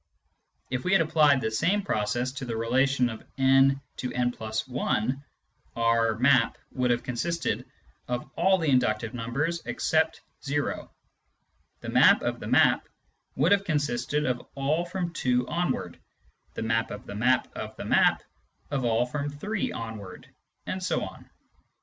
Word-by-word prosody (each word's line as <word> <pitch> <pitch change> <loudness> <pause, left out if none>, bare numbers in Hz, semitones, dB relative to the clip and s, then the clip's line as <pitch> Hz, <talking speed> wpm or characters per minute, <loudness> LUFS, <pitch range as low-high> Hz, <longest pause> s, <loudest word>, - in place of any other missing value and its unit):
If 130 -1 -2
we 185 - +1
had 195 - +6
applied 150 -4 +4
the 110 -1 -1
same 195 - +1
process 120 - -1
to 135 -1 -6
the 115 -2 -3
relation 125 +3 +2
of 110 -2 -7
n 135 +1 +4 0.2
to 125 - -3
n 125 0 0
\ - - -20
i, 110 0 -1 0.7
our 115 -1 +2
" - - -11
map 130 -1 +3
" - - -44
would 125 -1 0
have 120 0 +1
consisted 165 +7 -2 0.4
of 120 0 -3
all 190 +2 +4
the 160 -5 0
inductive 115 -2 +1
numbers 135 +8 -2
except 160 0 0 0.3
o; 145 0 -2 0.9
the - - -6
map - - +5
of - - -2
the - - -7
map - - +3 0.5
would 150 +8 +2
have 200 -1 +4
consisted 145 -4 -1
of 125 -1 -1
all 150 +5 0
from 175 -1 -4
2 125 -4 +1
onward, 175 +1 -2 0.6
Hie - - -3
map 115 0 0
of 105 - -8
the - - -7
map 125 +5 +2
of - - -6
the - - -6
map - - +3 0.5
of 140 -3 -1
all 115 0 +2
from 145 +3 -3
3 190 +9 -3
onward; 110 -5 -7 0.4
and 185 - -4
so 185 - 0
on. - - -9
130 Hz, 160 wpm, -27 LUFS, 115-155 Hz, 0.9 s, had